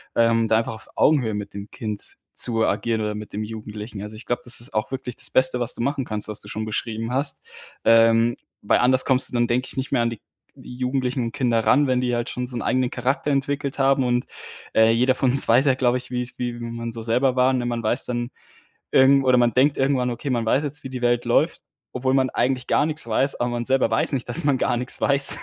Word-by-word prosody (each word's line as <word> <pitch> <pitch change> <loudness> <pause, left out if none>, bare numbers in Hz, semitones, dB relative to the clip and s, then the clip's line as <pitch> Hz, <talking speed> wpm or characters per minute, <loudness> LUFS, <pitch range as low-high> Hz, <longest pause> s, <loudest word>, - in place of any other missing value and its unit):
Ähm, 115 -1 +2
da 110 - +3
einfach 115 - -4
auf 110 - -15
Augenhöhe 130 -8 +2
mit 105 -1 -6
dem 100 +1 -8
Kind 105 -2 -6 0.2
zu 115 -2 0
agieren 110 +2 -1
oder 105 0 -3
mit 105 0 -9
dem 105 +2 -3
Jugendlichen. 105 -1 -8
Also, 105 +1 -8
ich 110 - -11
glaube, 120 0 -2
das 120 -1 +2
ist 120 - -4
auch 110 +3 -2
wirklich 130 -2 -5
das - - -2
Beste, 130 -1 +3
was 120 - +1
du - - -7
machen 135 +1 -1
kannst, 105 -2 -2
was 105 - -1
du - - -3
schon 110 +1 -5
beschrieben 110 +1 -4
hast. 135 +2 0 0.4
Ähm, 115 +1 +4 0.3
weil 100 - +2
anders 130 +1 +3
kommst 130 -1 +4
du - - -19
dann, 120 -1 +1
denke 125 +2 0
ich - - -9
nicht 135 0 -4
mehr 125 -4 +2
an 115 - -1
die 115 - -9 0.4
Jugendlichen 125 +1 -3
und 115 - -3
Kinder 120 -3 0
ran, 145 +2 +4
wenn 130 -1 +1
die 125 -1 -1
halt 120 0 -3
schon 125 - -4
so 125 - -7
'n - - -3
eigenen 130 -1 0
Charakter 130 +4 -2
entwickelt 140 0 -2
haben 135 0 +3
und, 125 0 0 0.5
äh, 110 0 +5
jeder 125 +3 +2
von 130 0 +1
uns 135 +1 +7
weiß 120 +5 +4
ja, 135 - +4
glaube 125 -1 +1
ich, 125 0 -9
wie's 125 0 -4
wie 120 -1 -2
man 115 0 -6
so 115 0 -7
selber 125 +3 +1
war, 130 +1 +3
ne? 125 -2 -1
Man 120 -1 -2
weiß 110 +3 +1
dann 120 -1 -3 0.6
irgend 135 +1 +5
oder 130 -1 +4
man 120 -2 +2
denkt 135 +4 +2
irgendwann: 135 -2 +1
„Okay, 120 +4 -5
man 120 -3 -1
weiß 130 +6 +1
jetzt, 145 0 -5
wie - - -5
die 130 -1 -6
Welt 120 0 +1
läuft“, 150 +8 +1 0.3
obwohl 130 +1 -1
man 130 -1 +2
eigentlich 125 +1 -1
gar - - +2
nix 155 -4 -1
weiß, 130 +5 +1
aber 120 - -2
man 120 0 -3
selber 135 +1 +2
weiß - - +1
nicht, 130 -3 -3
dass 120 - +5
man 140 -3 +2
gar - - 0
nix 125 +1 -1
weiß. 140 0 +2
125 Hz, 250 wpm, -22 LUFS, 115-130 Hz, 0.6 s, uns